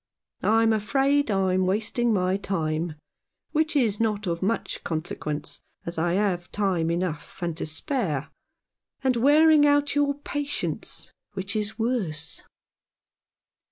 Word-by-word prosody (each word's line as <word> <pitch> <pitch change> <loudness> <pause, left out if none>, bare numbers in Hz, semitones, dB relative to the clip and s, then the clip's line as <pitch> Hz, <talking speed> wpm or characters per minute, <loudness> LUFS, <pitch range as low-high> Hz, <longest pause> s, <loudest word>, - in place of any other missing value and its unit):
I'm 225 +1 +4
afraid 270 +6 +2
I'm 185 -2 +2
wasting 220 +4 +1
my 185 -2 +2
time, 165 -4 -2 0.6
which 310 0 +1
is 225 -7 +2
not 215 -2 0
of 170 -2 -2
much 220 +4 -1
consequence, 155 -2 -4 0.2
as 170 -1 -4
I 170 +1 +1
have 185 -3 0
time 185 -5 0
enough 170 0 -3
and 170 -2 -1
to 160 - -2
spare, 160 - -1 0.7
and 260 -2 +3
wearing 300 +5 +6
out 290 0 +3
your 285 -1 +2
patience, 290 0 -4 0.2
which 195 +2 -3
is 210 0 -2
worse." 200 -10 -2
205 Hz, 125 wpm, -26 LUFS, 175-255 Hz, 0.7 s, wearing